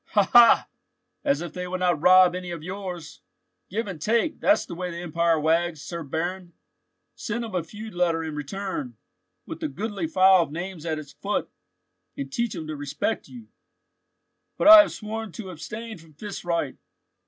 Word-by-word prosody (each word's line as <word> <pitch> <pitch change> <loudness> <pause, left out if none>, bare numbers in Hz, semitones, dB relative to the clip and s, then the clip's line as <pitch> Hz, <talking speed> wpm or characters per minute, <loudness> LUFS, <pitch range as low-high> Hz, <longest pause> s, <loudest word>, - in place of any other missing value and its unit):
"Ha! 205 - +6
ha! 240 -1 +7 0.6
as 280 -1 +1
if 175 -3 -6
they 180 0 -5
would 185 0 -4
not 175 -4 +1
rob 185 0 +7
any 180 0 -5
of 170 -3 -6
yours. 180 - -7 0.5
Give 225 +5 -2
and 185 -7 -7
take, 230 - +1
that's 305 - +3
the - - -8
way 180 +1 -4
the 170 - -7
empire 170 -1 +1
wags, 165 +1 +1
Sir 170 +3 -6
Baron. 175 +4 -4 0.6
Send 235 +1 -4
him 220 - -9
a 180 -2 -1
feud 215 +5 -9
letter 170 -2 +1
in 160 -1 -5
return, 150 - -5 0.5
with - - -8
a - - -1
goodly 195 +3 -4
file 190 +2 +5
of 165 - -3
names 170 0 -6
at 160 -1 -1
its 150 -2 -9
foot, 205 +1 -3 0.7
and 280 -1 -6
teach 235 -4 -1
him 160 - -5
to 155 0 -5
respect 145 +9 -3
you." 235 -3 -12 1.1
"But - - +5
I 320 -1 +12
have - - -1
sworn 220 -1 -6
to 190 -4 -7
abstain 215 +6 -7
from 160 -1 -18
fist 205 +7 -7
right." 170 -6 -2
180 Hz, 185 wpm, -25 LUFS, 165-210 Hz, 1.1 s, I